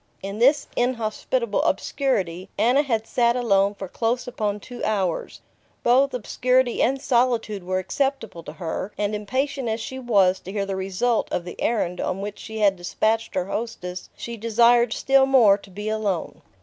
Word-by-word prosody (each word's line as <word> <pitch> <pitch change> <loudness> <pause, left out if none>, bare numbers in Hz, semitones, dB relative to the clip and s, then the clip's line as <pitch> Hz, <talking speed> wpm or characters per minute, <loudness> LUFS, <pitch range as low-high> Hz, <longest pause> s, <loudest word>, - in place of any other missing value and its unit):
In 195 +2 -5
this 275 +5 +4
inhospitable 235 -1 0
obscurity 190 - -1
Anna 245 +7 +4
had 230 -6 -1
sat 235 0 +2
alone 200 -4 +2
for 195 -1 -6
close 235 +6 -1
upon 210 -4 -2
two 245 +4 -9
hours. 190 -5 -1 0.4
Both 260 +3 +3
obscurity 250 +2 +1
and 270 +3 +2
solitude 235 -6 +1
were 185 +1 -1
acceptable 225 -1 -2
to 150 - -7
her, 170 +4 -4
and 205 0 -1
impatient 260 +5 -2
as 220 +1 -1
she 260 +3 -6
was 195 -7 +3
to 190 - -9
hear 200 -1 -1
the 195 -1 -3
result 195 +5 -1
of 175 - -2
the 175 - -8
errand 180 -6 0
on 185 - -2
which 205 +1 -6
she 220 0 -7
had 200 -3 +3
despatched 220 +5 -1
her 185 - 0
hostess, 195 -4 -5
she 235 0 -6
desired 235 +1 +4
still 270 +2 +3
more 240 -7 +6
to 200 - -16
be 205 +3 -7
alone. 205 -7 -2
220 Hz, 170 wpm, -23 LUFS, 195-245 Hz, 0.4 s, more